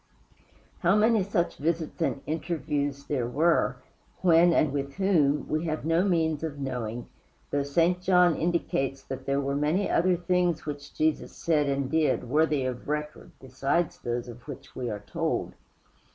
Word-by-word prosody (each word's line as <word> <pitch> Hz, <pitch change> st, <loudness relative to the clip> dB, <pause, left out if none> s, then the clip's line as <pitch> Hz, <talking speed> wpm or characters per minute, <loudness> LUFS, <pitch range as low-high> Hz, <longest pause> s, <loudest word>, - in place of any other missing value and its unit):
How 175 Hz, +4 st, +3 dB
many 220 Hz, 0 st, +4 dB
such 185 Hz, -3 st, -1 dB
visits 160 Hz, +2 st, -2 dB
and 140 Hz, -4 st, 0 dB
interviews 145 Hz, -3 st, -2 dB
there 130 Hz, -5 st, -1 dB
were 160 Hz, +7 st, +2 dB, 0.5 s
when 170 Hz, 0 st, +6 dB
and 155 Hz, -3 st, +2 dB
with 140 Hz, -1 st, -3 dB
whom 160 Hz, -7 st, +2 dB
we 155 Hz, +2 st, -1 dB
have 155 Hz, -2 st, -3 dB
no 165 Hz, +2 st, +3 dB
means 160 Hz, -5 st, +1 dB
of 160 Hz, -3 st, -4 dB
knowing, 120 Hz, -4 st, -4 dB, 0.4 s
though 145 Hz, -, +1 dB
St. 165 Hz, +6 st, +1 dB
John 180 Hz, -2 st, +4 dB
indicates 135 Hz, -5 st, -1 dB
that 135 Hz, -, -7 dB
there 140 Hz, 0 st, +1 dB
were 140 Hz, 0 st, -1 dB
many 155 Hz, +7 st, +1 dB
other 180 Hz, +1 st, +3 dB
things 175 Hz, -2 st, 0 dB
which 145 Hz, -1 st, -7 dB
Jesus 155 Hz, 0 st, 0 dB
said 150 Hz, -3 st, +1 dB
and 135 Hz, -1 st, -1 dB
did 160 Hz, -5 st, +1 dB
worthy 150 Hz, +1 st, +2 dB
of 125 Hz, -1 st, -4 dB
record 150 Hz, 0 st, -4 dB
besides 135 Hz, +6 st, -1 dB
those 120 Hz, 0 st, -3 dB
of 120 Hz, +2 st, -11 dB
which 140 Hz, -1 st, -9 dB
we 125 Hz, -2 st, -3 dB
are 105 Hz, -2 st, -5 dB
told. -, -, -2 dB
150 Hz, 160 wpm, -27 LUFS, 140-170 Hz, 0.5 s, when